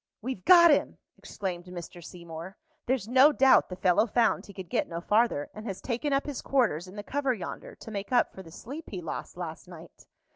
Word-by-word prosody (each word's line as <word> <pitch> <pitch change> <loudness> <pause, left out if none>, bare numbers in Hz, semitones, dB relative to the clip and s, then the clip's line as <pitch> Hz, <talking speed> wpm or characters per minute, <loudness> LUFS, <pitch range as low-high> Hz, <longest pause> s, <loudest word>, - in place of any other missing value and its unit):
"We've 235 -5 -5
got 340 -2 +8
him!" 290 - +1 0.2
exclaimed 180 -3 -6
Mr. 175 -1 -9
Seymour. 170 +2 -9 0.3
"There's 250 -5 0
no 260 +5 +6
doubt 270 -2 +5
the 180 - -5
fellow 185 +4 +3
found 230 +1 +1
he - - -10
could 190 -2 -7
get - - 0
no 170 - -5
farther, 210 -5 +1
and 215 +2 -8
has 195 -3 -5
taken 260 +4 -2
up 275 0 +1
his 290 -3 -5
quarters 215 - +1
in 185 - -12
the 205 - -6
cover 275 +1 -1
yonder, 185 - -8
to 225 - -11
make 200 +1 -5
up 245 - +2
for 190 - -9
the 170 - -13
sleep 275 - -9
he 190 - -5
lost 165 +1 -6
last 170 -1 -7
night." 170 -2 -14
205 Hz, 215 wpm, -28 LUFS, 175-260 Hz, 0.3 s, got